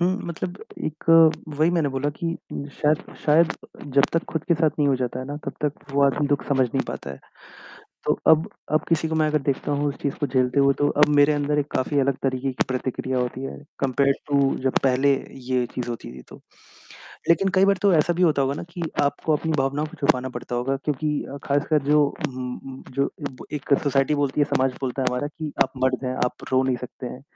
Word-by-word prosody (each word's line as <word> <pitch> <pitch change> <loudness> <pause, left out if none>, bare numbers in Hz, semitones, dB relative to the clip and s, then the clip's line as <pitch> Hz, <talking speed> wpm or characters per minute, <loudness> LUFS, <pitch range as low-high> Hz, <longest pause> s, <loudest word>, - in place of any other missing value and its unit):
हुँ, 180 +2 +2
मतलब 175 +2 -5 0.3
एक 155 0 -5 0.4
वही 155 +3 +2
मैंने 165 -4 +1
बोला 135 +1 -1
कि 165 +3 -5 0.3
उम, 140 - -4 0.2
शायद 150 0 +3 0.2
शायद 160 +2 +4 0.4
जब 140 0 +6
तक 165 - +1
ख़ुद 160 -1 -2
के 170 - +3
साथ 155 -1 +2
नहीं 145 - +3
हो 135 - +3
जाता 125 0 -3
है - - -5
ना, 145 - -5
तब - - -2
तक 145 0 -4
वो 140 - +3
आदमी 145 +1 +2
दुःख 145 -1 0
समझ 130 -2 +3
नहीं - - -1
पाता 70 - -5
है। 70 - -8 0.9
तो - - +1
अब 160 0 +5 0.2
अब 155 - +2
किसी 160 -1 +1
को 160 - -2
मैं 155 -1 +3
अगर 150 - +2
देखता 140 +1 0
हूँ 145 - 0
उस 140 - -4
चीज़ 140 - -1
को 145 - +1
झेलते 130 +1 +2
हुए 140 0 +4
तो 145 - +3
अब - - +7
मेरे 145 +1 +6
अंदर 145 0 0
एक 145 - +1
काफ़ी 140 +2 0
अलग 135 -1 +1
तरीक़े 130 0 -1
की - - 0
प्रतिक्रिया 130 0 -2
होती 125 +1 -2
है - - -6 0.2
कंपेयर्ड 135 +1 +2
टू 140 -1 +3 0.2
जब 130 - +2
पहले 135 +2 +4 0.4
ये 125 -1 +1
चीज़ 125 -1 -3
होती 115 - -6
थी 65 - -11
तो। - - -13 0.9
लेकिन 170 +4 +4
कई 190 - +5
बार 195 0 +4
तो 200 - +5
ऐसा 160 +2 +3
भी 180 - 0
होता 155 -5 +4
होगा 135 +1 0
ना - - -5
कि 175 0 -6 0.2
आपको 145 +2 0
अपनी 160 +2 -2
भावनाओं 140 +3 0
को 155 - -12
छुपाना 130 -4 +2
पड़ता 120 0 -5
होगा 135 +3 0
क्योंकि 150 +2 -2 0.2
अ, 140 - -6
ख़ासकर 145 +1 +1
जो 150 +1 +4 0.2
उम 125 -1 -5
उम, 135 -1 -10
जो 140 +2 0 0.2
इब 130 - -12
एक 140 0 +1
सोसाइटी 140 +1 +2
बोलती 145 0 0
है 145 - +6
समाज 130 0 +2
बोलता 130 0 -2
है - - 0
हमारा 125 +3 -1
कि 155 0 -6
आप 130 - -9
मर 130 0 +3
जाएँ 130 -1 -2
आप 125 - -4
रो 130 0 +4
नहीं 130 -2 +1
सकते 125 +1 -8
हैं। 125 +2 -8
140 Hz, 230 wpm, -24 LUFS, 130-150 Hz, 0.9 s, अब